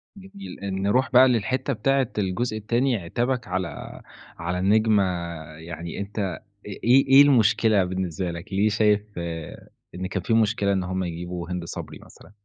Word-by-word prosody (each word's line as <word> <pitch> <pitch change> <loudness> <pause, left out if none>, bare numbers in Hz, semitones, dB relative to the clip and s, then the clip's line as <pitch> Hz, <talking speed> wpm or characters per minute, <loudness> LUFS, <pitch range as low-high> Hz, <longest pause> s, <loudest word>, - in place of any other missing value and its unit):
جميل، 195 0 -11 0.2
نرُوح 125 +8 +1
بقى 130 0 +7
للحتة 130 +3 0
بتاعة 135 +2 +1
الجزء 110 +3 -1
التاني، 120 +4 0
عتابك 120 +7 -2
على 90 -1 -5 0.4
على 90 0 -3
النجمة 105 +2 +3 0.5
يعني 85 +1 -7
أنت 100 +2 -5
أ 95 -5 -2 0.3
إيه، 120 +7 +2
إيه 135 +1 +8
المشكلة 110 -6 +4
بالنسبة 90 -1 -3
لك؟ 85 +3 -9
ليه 100 +3 +2
شايف 105 0 +3 0.2
آآ، 85 -2 -6 0.3
إن 95 +1 -4
كان 95 0 -3
فيه - - 0
مشكلة 105 -2 +2
إن 95 -1 0
هُم 95 +1 -2
يجيبوا 85 0 -5
هند 90 -1 -3
صبري - - -8
مثلًا؟ - - -17
100 Hz, 155 wpm, -24 LUFS, 90-120 Hz, 0.5 s, إيه